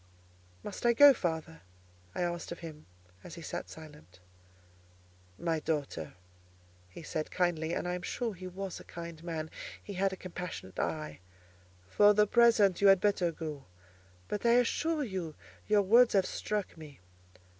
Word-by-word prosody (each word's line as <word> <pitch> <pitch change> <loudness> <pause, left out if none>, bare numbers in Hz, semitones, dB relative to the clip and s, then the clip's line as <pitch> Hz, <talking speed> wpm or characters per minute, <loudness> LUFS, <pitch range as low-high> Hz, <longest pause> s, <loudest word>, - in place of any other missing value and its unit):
"Must 205 - -7
I 240 0 +5
go, 285 +3 +9
father?" 160 -6 -3 0.5
I - - 0
asked 175 -1 -3
of 170 - -7
him 155 -2 -9 0.4
as - - -9
he 170 - -9
sat - - -5
silent. 150 - -13 1.2
"My 165 +3 -1
daughter," 145 - -3 0.7
he 130 - -11
said 155 0 -3
kindly—and 170 -1 -1
I 180 - -1
am 180 - -4
sure 230 +4 -3
he 185 0 -8
was 190 0 -6
a - - -11
kind 170 -1 -9
man: 160 -2 -4 0.3
he 205 - -7
had 195 +1 +1
a - - -4
compassionate 180 - -7
eye—"for 90 - -1
the 210 0 +5
present 215 -5 +4
you 200 - +6
had 195 -1 +7
better 190 -4 +1
go: 155 -4 -7 0.6
but 205 - -3
I 235 0 +5
assure 295 +6 +2
you 185 - -4 0.3
your 210 -1 +4
words 235 +5 +6
have 195 -2 +4
struck 210 -2 -3
me. 150 -4 -12
175 Hz, 155 wpm, -31 LUFS, 155-205 Hz, 1.2 s, go